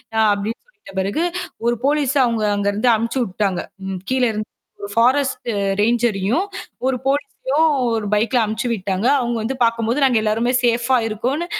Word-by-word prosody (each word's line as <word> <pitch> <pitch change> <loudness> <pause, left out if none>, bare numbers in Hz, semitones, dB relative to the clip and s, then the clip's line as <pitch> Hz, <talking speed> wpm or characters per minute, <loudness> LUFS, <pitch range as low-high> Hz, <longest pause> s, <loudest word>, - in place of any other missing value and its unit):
அ - - +2
அப்படின்னு 205 +3 -4
சொல்லிட்ட 430 - -16
பிறகு, 200 - 0 0.4
ஒரு 240 0 +2
போலிஸ் 285 -1 +1
அவங்க 230 -2 -1
அங்க 205 0 -1
இருந்து 220 +4 +1
அனுப்பிச்சு 230 +4 -1
விட்டாங்க. 190 -2 -1 0.3
ம் 185 - -4
கீழ 260 -1 +1
இருந்து 215 0 -4 0.3
ஒரு 200 - -6
ஃபாரஸ்ட் 260 +3 +2 0.3
ரேஞ்சரயும் 230 - +1 0.4
ஒரு 265 -1 +1
போலிஸயும் 280 +2 +1 0.2
ஒரு 220 -2 -1
பைக்ல 225 +3 +2
அனுப்பிச்சு 220 +3 -2
விட்டாங்க. 195 +1 -1
அவங்க 240 -1 -1
வந்து 260 +5 -2
பாக்கும்போது 230 +4 +1
நாங்க 250 -4 +3
எல்லாருமே 225 +3 +1
சேஃபா 240 +2 +2
இருக்கோம்னு 255 +10 -2
235 Hz, 155 wpm, -20 LUFS, 215-260 Hz, 0.4 s, நாங்க